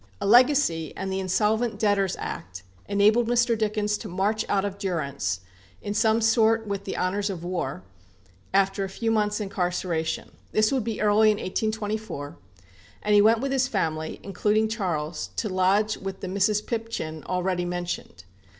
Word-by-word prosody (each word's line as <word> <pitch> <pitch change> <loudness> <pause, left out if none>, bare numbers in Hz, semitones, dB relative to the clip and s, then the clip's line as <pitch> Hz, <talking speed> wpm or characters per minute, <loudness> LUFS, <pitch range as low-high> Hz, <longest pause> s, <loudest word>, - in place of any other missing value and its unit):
A - - -3
legacy, 240 - +4
and 190 +1 -3
the 190 - -1
Insolvent 215 +5 +1
Debtors 200 -3 +1
Act, 90 +1 -6 0.2
enabled 210 +4 +3
Mr. 240 0 +3
Dickens 210 -1 0
to 220 - -7
march 200 +4 0
out 200 -1 +2
of 200 0 -5
durance, 140 - -2 0.4
in 205 - -4
some 220 +1 +3
sort 225 0 +3
with 200 -1 -4
the 190 - -4
honours 200 +3 0
of 180 -4 -5
war, 175 - -3 0.7
after 195 0 +2
a 195 - -3
few 225 +4 -2
months' 210 -1 +1
incarceration 180 -5 -2 0.2
this 215 0 +3
would 265 -4 +1
be 225 -1 -3
early 210 +1 +5
in 210 - +2
1824; 215 - -3 0.7
and 210 - +2
he 205 - +7
went 225 +2 +4
with 275 0 -1
his 265 -1 +2
family, 160 -9 -2
including 210 +3 +1
Charles, 175 -8 -3
to 220 - -1
lodge 195 +3 +2
with 195 0 -6
the 190 - -4
"Mrs. 200 +3 +1
Pipchin" 225 -10 -4
already 180 0 -1
mentioned. 175 - -4
205 Hz, 160 wpm, -26 LUFS, 185-220 Hz, 0.7 s, he